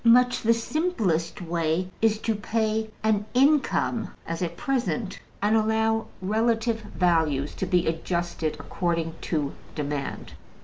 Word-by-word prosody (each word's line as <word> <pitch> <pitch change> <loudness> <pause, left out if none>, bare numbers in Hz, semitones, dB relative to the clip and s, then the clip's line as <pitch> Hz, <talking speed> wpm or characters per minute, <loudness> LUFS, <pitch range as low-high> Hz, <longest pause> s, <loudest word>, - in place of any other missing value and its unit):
Much 245 +1 +5
the 230 - +3
simplest 230 - 0
way 165 +1 0
is 220 -1 +4
to 225 +1 0
pay 220 +1 -1
an 215 -1 +2
income, 270 -3 +3
as 165 +1 -4
at 170 -1 -2
present, 240 -6 -1 0.2
and 210 +2 +4
allow 220 0 +2 0.2
relative 225 +2 +1
values 160 -8 +1
to 190 - -3
be 180 -1 +2
adjusted 165 -1 -1
according 170 -3 -1
to 150 -4 -1 0.2
demand. 145 -2 -4
210 Hz, 125 wpm, -26 LUFS, 165-225 Hz, 0.2 s, Much